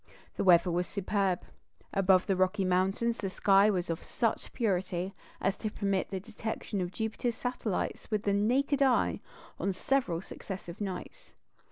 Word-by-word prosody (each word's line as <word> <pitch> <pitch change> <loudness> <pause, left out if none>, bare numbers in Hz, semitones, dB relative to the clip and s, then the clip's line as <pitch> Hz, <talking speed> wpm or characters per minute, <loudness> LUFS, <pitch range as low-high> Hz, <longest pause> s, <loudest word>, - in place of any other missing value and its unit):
The - - -1
weather 175 -1 +6
was 175 +1 0
superb; 195 -2 0 0.5
above 190 -1 +4
the 195 - +1
Rocky 185 +2 +2
Mountains 190 +6 +1
the 195 - -2
sky 195 +2 +5
was 185 -4 0
of 165 -1 -3
such 230 - -1
purity 190 -3 -1 0.3
as 195 - +1
to 215 - -2
permit 195 -2 -1
the 190 - -3
detection 215 -1 -4
of 175 -1 -2
Jupiter's 225 +2 -2
satellites 240 -6 -3
with 215 -2 0
the 200 - +2
naked 265 +7 +2
eye 265 -3 +3 0.4
on 195 - 0
several 185 -4 0
successive 190 0 -8
nights. 190 -3 -6
195 Hz, 155 wpm, -31 LUFS, 185-220 Hz, 0.5 s, weather